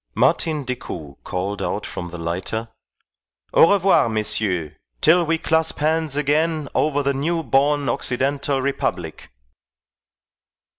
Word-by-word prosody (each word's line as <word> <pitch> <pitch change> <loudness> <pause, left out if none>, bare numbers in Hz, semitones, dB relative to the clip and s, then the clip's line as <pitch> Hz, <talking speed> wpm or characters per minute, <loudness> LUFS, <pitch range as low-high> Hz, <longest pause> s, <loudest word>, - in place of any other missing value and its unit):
Martin 155 -3 +1
Decoud 100 - -6
called 95 +3 -3
out - - -2
from 90 - -6
the 90 - -8
lighter, 95 +7 -4 0.8
"Au 165 - +6
revoir, 195 -11 +4
messieurs, 105 -7 0 0.3
till 170 +3 +5
we 165 +1 +2
clasp 160 +1 +1
hands 155 -1 0
again 150 +1 +1
over 145 -1 +1
the 140 0 +1
new 165 +5 -1
born 140 +2 +2
Occidental 135 +2 0
Republic." 140 0 -3
140 Hz, 115 wpm, -21 LUFS, 110-160 Hz, 0.8 s, Au